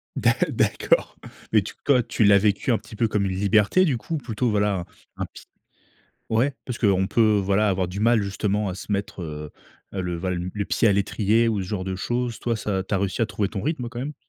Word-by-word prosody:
D'a - - +3 0.2
d'accord, - - +1 0.4
mais - - +6
tu - - -8
quand 125 -5 +3
tu 110 - +1
l'as 100 -1 +6
vécu 105 +4 +1
un 115 - +3
petit 110 - -13
peu 115 +1 +1
comme 105 -2 0
une 95 - -1
liberté 105 - +3
du 135 -7 +1
coup, 160 +8 -4
ou - - 0
plutôt, 120 -2 -2
voilà, 100 -4 0 0.3
un - - -2
petit - - -14 0.9
ouais 125 +5 +2
parce 125 -2 -5
qu'on 95 -3 +2
peut 110 -1 +3
voilà 100 +2 +2
avoir 95 -1 +1
du 95 +3 -5
mal 115 -1 +4
justement 100 +1 -1
à 90 - -3
se 100 - -9
mettre, 100 -1 -3
heu 75 -2 -6 0.4
heu, 95 - -2
le 90 -1 -2
valm 90 0 -3
le 105 - -1
pied 105 +5 +1
à - - +4
l'étrier 105 +3 +2
ou 105 -3 0
ce 95 - -4
genre 95 -2 -3
de 95 -1 -3
choses, 120 +3 -2
toi 115 -2 -1
ça 95 -3 -2
tu 100 - -3
as - - +2
réussi 100 +3 -2
à 115 - +3
trouver 105 -3 -1
ton 100 - -5
rythme 135 -5 -2
quand 120 0 -8
même? 145 +4 -4
105 Hz, 240 wpm, -24 LUFS, 95-115 Hz, 0.9 s, mais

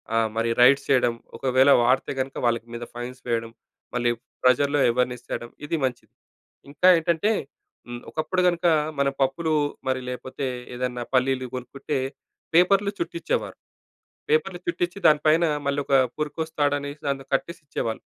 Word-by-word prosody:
ఆహ్, 115 -1 +2
మరి 115 +1 0
రైడ్స్ 130 +3 +6
చేయడం. 125 -3 +3 0.2
ఒకవేళ 130 +1 +3
వాడితే 125 +2 +2
గనక 135 +1 -3
వాళ్ళకి 115 -1 0
మీద 120 0 -5
ఫైన్స్ 125 +1 -6
వేయడం. 115 -1 -1 0.4
మళ్ళీ 120 -1 +1 0.3
ప్రజల్లో 140 +3 +3
ఎవర్నెస్ 125 0 -1
తేడం 120 - -4 0.2
ఇది 155 - -1
మంచిది. 125 -2 -3 0.6
ఇంకా 145 +5 +2
ఏంటంటే, 170 +5 +1 0.6
హ్మ్. 120 0 -6
ఒకప్పుడు 170 +4 -1
కనుక 175 0 0 0.3
మన 140 0 +3
పప్పులు 155 +4 +1 0.3
మరి 130 0 0
లేపోతే 130 +2 -5 0.3
ఏదన్నా 125 -1 -3
పల్లీలు 130 0 +2
కొనుక్కుంటే 135 +3 -4 0.6
పేపర్‌లు 195 +3 +4
చుట్టించేవారు. 355 +8 -2 0.7
పేపర్‌లు 460 +1 +1
చుట్టించి 180 - -2
దాని 150 -1 +4
పైన 160 +3 +5 0.2
మళ్ళీ 140 +1 0
ఒక 140 - +2 0.2
పురుకొస 155 +1 -3
తాడు 145 0 +3
అనేసి 145 +1 -7 0.3
కట్టేసిచ్చేవాళ్ళు. 140 -6 -3
135 Hz, 135 wpm, -24 LUFS, 125-160 Hz, 0.7 s, రైడ్స్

